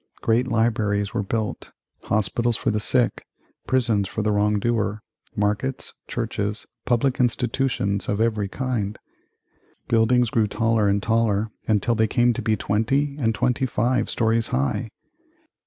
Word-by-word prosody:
Great 115 +3 +2
libraries 110 -4 0
were 115 - 0
built; 110 +1 -3 0.4
hospitals 115 +3 +1
for - - 0
the 105 - 0
sick; 120 +2 +1 0.4
prisons 115 -6 +2
for 110 +2 -3
the 105 - +1
wrong 105 0 +2
doer, 110 -1 -1 0.3
markets, 105 +6 -1
churches, 105 +1 -3 0.2
public 125 +2 +1
institutions 120 -4 0
of 100 - 0
every 110 -3 +1
kind. 110 -3 -3 0.9
Buildings 120 +1 +3
grew 115 -5 +2
taller 115 0 +1
and 100 0 +1
taller 110 -2 +1 0.2
until 110 +2 +2
they 110 -1 +2
came 120 +1 +3
to - - -4
be 110 - +1
twenty 135 +9 0
and 115 -4 +1
twenty 125 +4 +1
five 125 +2 0
stories 115 0 +1
high. 70 - -1
110 Hz, 140 wpm, -23 LUFS, 105-120 Hz, 0.9 s, Buildings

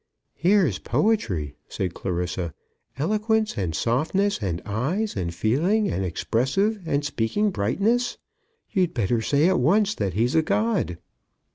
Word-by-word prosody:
"Here's 175 - +2
poetry," 120 - 0
said 95 -4 -3
Clarissa. 90 -2 -3 0.4
"Eloquence, 215 +7 +1
and 90 -6 -2
softness, 160 - +1
and 90 -4 -2
eyes, 155 - -1
and 85 -2 -2
feeling, 170 - +1
and 95 - -1
expressive 135 - 0
and 145 -1 0
speaking 150 - 0
brightness! 220 - 0 0.5
You'd 185 -8 +1
better 115 0 +1
say 145 +7 +3
at 185 -1 +3
once 200 +10 +3
that 95 -4 -2
he's 120 +4 +1
a 160 - +4
god." 190 - 0
140 Hz, 130 wpm, -24 LUFS, -, 0.5 s, a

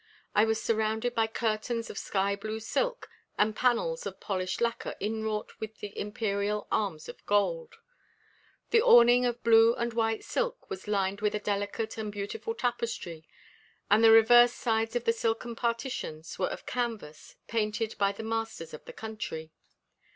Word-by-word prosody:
I 210 - +5
was 220 0 0
surrounded 220 +2 0
by 225 -1 +2
curtains 225 +1 -2
of - - -10
sky 200 0 0
blue 215 +2 -5
silk - - -2 0.3
and 210 +1 +2
panels 485 - +1
of - - -8
polished 185 -2 -2
lacquer 235 -1 -1
inwrought 215 0 -2
with 220 0 -6
the 205 -1 -8
Imperial 205 0 -2
arms 185 -8 -1
in - - -8
gold. 470 - +1 1.0
The 455 - +5
awning 245 - +7
of 240 0 -4
blue 230 0 +6
and 235 0 -2
white 225 -1 0
silk - - -3
was 190 +1 -6
lined 200 -1 0
with 210 0 +1
a - - -1
delicate 205 +2 -3
and 215 -1 -3
beautiful 205 - -4
tapestry, 225 - -3 0.6
and 215 +2 +5
the 225 - +8
reverse 240 +2 +7
sides 225 0 -1
of 240 - 0
the 230 - +3
silken 230 +1 -2
partitions 230 - -3
were 185 - +1
of - - -7
canvas 225 -11 -4
painted 215 0 -1
by 200 -1 +3
the 200 +3 -8
masters 225 -6 -4
of 155 - -9
the - - -9
country. 215 -8 -6
220 Hz, 160 wpm, -29 LUFS, 205-235 Hz, 1.0 s, the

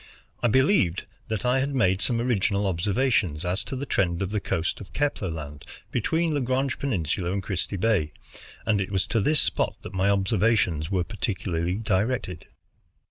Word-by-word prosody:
I 120 - +3
believed 130 - +3 0.2
that 110 0 -3
I 125 +2 +3
had 140 +1 -1
made 95 -6 +2
some 120 -2 +1
original 105 -4 +1
observations 95 - +1
as 90 +3 0
to - - -5
the 135 +2 -3
trend 90 -6 0
of 95 - -4
the 105 - 0
coast 85 -1 -2
of 100 - -11
Kepler 145 -10 -1
Land 75 -3 -7 0.3
between 160 +7 +1
Lagrange 130 -1 0
Peninsula 90 - -1
and 100 0 -2
Christie 100 +1 -2
Bay, 95 -7 +1 0.5
and 105 -2 +2
it 95 - -3
was 95 -2 +1
to 115 - 0
this 150 +8 +3
spot - - 0
that - - -8
my 95 +1 +2
observations 100 -5 +2
were 95 -3 +1
particularly 90 -4 -2
directed. 105 -4 -1
100 Hz, 170 wpm, -26 LUFS, 90-120 Hz, 0.5 s, I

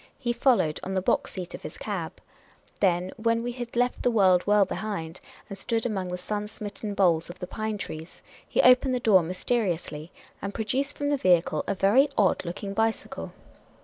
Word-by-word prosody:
He 240 -3 -1
followed, 235 - +2
on 190 +1 -4
the 185 - +1
box - - +1
seat 180 -2 -6
of - - -7
his - - -8
cab. - - -4 0.7
Then, 180 -1 +2
when 230 0 +1
we 245 - -2
had 240 -1 -7
left 245 +1 +1
the - - +3
world 190 -6 +4
well 205 -1 +5
behind, 185 -5 -5 0.3
and 200 - -7
stood 225 +3 -1
among 195 -6 -2
the 180 - -3
sun 210 +3 -3
smitten 205 0 -6
boles 170 -5 +2
of 175 - -9
the 180 - -5
pine 215 +3 -3
trees, 160 -3 -8 0.3
he - - +2
opened 255 +1 +5
the - - 0
door 210 -6 +5
mysteriously, 175 -3 -2 0.3
and 200 0 -5
produced 260 +6 -1
from 285 0 -1
the 290 - +2
vehicle 175 - +2
a - - 0
very 235 +10 +4
odd 200 -3 +3
looking 195 +3 -5
bicycle. 225 +1 -2
205 Hz, 190 wpm, -27 LUFS, 180-235 Hz, 0.7 s, well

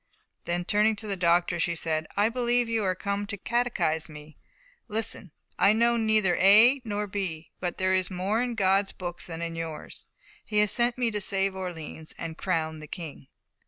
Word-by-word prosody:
Then 175 +1 -2
turning 215 +2 +3
to 215 +1 -7
the 200 -2 -2
doctors, 175 -1 +2
she 170 0 +1
said, 160 -1 -2
"I 205 +1 +4
believe 240 0 +1
you 225 -2 0
are 185 -1 +1
come 200 +1 -3
to 200 - -5
catechise 190 -9 0
me. 150 0 -12 0.5
Listen! 220 -4 -4 0.3
I 200 - +6
know 235 +2 +3
neither 215 -5 +2
A 225 +8 +7
nor 210 -2 -2
B, 185 -5 -4
but 180 -1 -3
there 185 0 +1
is 185 -1 +1
more 195 +5 -1
in 245 -1 -2
God's 195 -1 +2
books 175 -1 -6
than 165 -1 -5
in 165 0 -4
yours. 165 -2 -7 0.4
He 210 - -3
has 210 -1 +4
sent 240 0 +2
me 240 -2 +1
to 210 -1 -2
save 195 -1 0
Orleans 165 -4 -6
and 165 -1 -5
crown 160 -3 -2
the 155 - -10
King." 150 -5 -8
195 Hz, 190 wpm, -27 LUFS, 170-220 Hz, 0.5 s, A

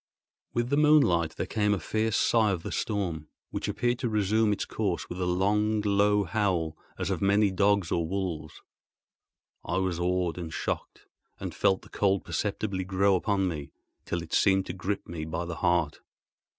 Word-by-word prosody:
With 120 +2 0
the 140 - +3
moonlight 140 - +4
there - - -2
came 105 -2 +1
a - - -4
fierce 110 +2 0
sigh 110 -2 +3
of 90 -4 -2
the - - -5
storm, 90 -8 -2 0.2
which - - -3
appeared 120 0 0
to 120 - -1
resume 105 +1 +2
its 105 - -1
course 100 -6 -2
with 90 +1 -6
a 90 - 0
long, 105 +4 +2
low 105 0 +3
howl, 90 -4 0 0.2
as - - -2
of - - -2
many 100 +1 +3
dogs 100 -2 +2
or 85 -1 0
wolves. 85 -4 -4 1.0
I 85 - -2
was 95 -2 0
awed 90 -1 0
and 85 -2 -5
shocked, - - -4 0.3
and - - -5
felt 95 - +2
the - - -15
cold 100 -2 +1
perceptibly 100 -2 -2
grow 95 +1 +2
upon 95 0 +1
me 75 -5 -5 0.3
till 85 0 -3
it 80 - -11
seemed 95 -1 +3
to - - -5
grip 95 +2 -3
me 80 -2 -5
by 80 +2 -3
the 85 -2 -5
heart. 85 -4 +1
95 Hz, 180 wpm, -28 LUFS, 85-105 Hz, 1.0 s, moonlight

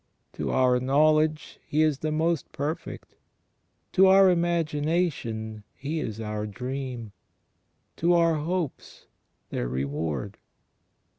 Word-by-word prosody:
To - - -3
our 125 -1 +3
knowledge 155 +4 +2
He 155 +2 +1
is 150 -3 +1
the 155 - -2
Most 160 0 0
Perfect; 150 +4 -5 0.8
to 190 0 +6
our 190 0 +7
imagination 155 - -1
He 150 +4 -3
is 110 -7 -4
our 105 -1 -3
dream; 125 0 -5 0.9
to 170 +1 +3
our 170 -1 +4
hopes 165 0 -4 0.5
their - - -2
Reward. 70 +3 -3
150 Hz, 105 wpm, -26 LUFS, 115-165 Hz, 0.9 s, our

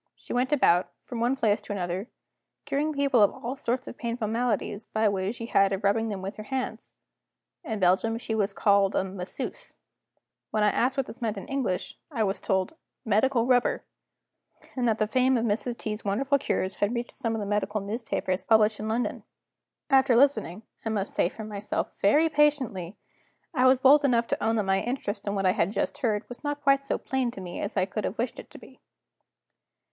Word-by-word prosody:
She - - -8
went 250 +3 +1
about, 180 -11 +3 0.2
from 240 - -5
one 240 +3 +2
place 215 -4 +1
to 205 - -9
another, 185 +1 -3 0.6
curing 295 +3 0
people 280 -5 +2
of 205 - +6
all 245 +3 -5
sorts 250 -1 -2
of - - -9
painful 235 -2 -2
maladies, 225 -2 -1
by 220 - -1
a 210 - +4
way 190 0 -1
she 235 -1 -7
had 195 -4 +3
of 195 0 -2
rubbing 220 +3 +2
them 195 -3 -5
with 195 +3 -5
her - - -6
hands. 265 -1 -4 0.7
In 220 -3 -3
Belgium 190 +5 +2
she 230 -1 -4
was 205 -2 +1
called 200 -1 +3
a - - +2
"Masseuse." 190 - -6 0.7
When 215 - 0
I 210 - +4
asked 260 +3 +1
what 270 - +1
this 240 - -11
meant 220 -3 -1
in 195 - -7
English, 260 -10 -2
I 240 -8 -1
was 195 -1 -1
told, 190 +6 0 0.3
"Medical 230 +3 +2
Rubber," 250 -1 +2 0.9
and 250 -2 0
that 220 -1 +2
the 215 - +2
fame 255 +3 +2
of 230 - 0
Mrs. 235 +2 -1
T.'s 215 0 -5
wonderful 270 +8 +1
cures 190 -7 -2
had 205 +4 0
reached 240 0 -3
some 230 -4 -2
of - - -2
the 205 - -3
medical 210 +1 -1
newspapers 200 -3 -2
published 220 -1 +4
in 215 - -4
London. 230 +3 -1 0.7
After 265 -2 +5
listening 230 -7 +2 0.2
(I 225 - -2
must 205 -2 -2
say 175 - +2
for 220 - -9
myself) 210 -1 -3
very 295 +11 +4
patiently, 270 - +1 0.6
I 255 -3 +4
was 255 0 +5
bold 285 +3 +6
enough 240 -4 +3
to - - -1
own 225 +1 +2
that 215 - +1
my 195 0 +1
interest 240 -5 -4
in 200 - -1
what 195 -1 -1
I 185 - +5
had 185 +1 0
just 205 - -2
heard 220 -5 0
was 245 - -10
not 290 0 -3
quite 275 0 +3
so - - 0
plain 265 -2 -1
to 235 - -8
me 180 -1 -6
as 200 - -4
I 185 - +3
could 200 +2 -4
have 205 - -3
wished 240 +2 -2
it - - -11
to - - -13
be. - - -16
225 Hz, 210 wpm, -27 LUFS, 200-255 Hz, 0.9 s, of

